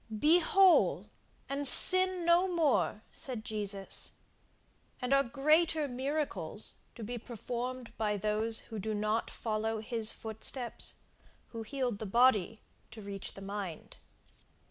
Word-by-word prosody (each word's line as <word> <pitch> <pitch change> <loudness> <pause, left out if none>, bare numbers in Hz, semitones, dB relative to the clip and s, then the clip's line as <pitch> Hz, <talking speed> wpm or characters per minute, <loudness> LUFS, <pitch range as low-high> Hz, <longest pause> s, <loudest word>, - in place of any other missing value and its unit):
Be 320 +7 +5
whole, 375 +2 +3 0.4
and 280 +1 +3
sin 370 +3 +8
no 345 +2 +4
more, 310 - 0
said 245 -5 -5
Jesus. 200 -2 -3 0.9
And 250 +1 -2
are 275 - +4
greater 305 +4 +1
miracles 255 - -4 0.2
to 230 - -9
be 240 +3 -6
performed 245 +2 -7
by 210 -2 -1
those 215 +2 -2
who 220 -2 -9
do 215 +2 -4
not 215 +2 -2
follow 220 0 -3
his 220 0 +1
footsteps, 225 +2 -5 0.5
who 230 - -8
healed 245 -2 -4
the 220 - -6
body 225 -2 +2 0.3
to 220 - -12
reach 200 -1 -8
the 195 - -11
mind? 195 -5 -7
235 Hz, 125 wpm, -31 LUFS, 215-275 Hz, 0.9 s, sin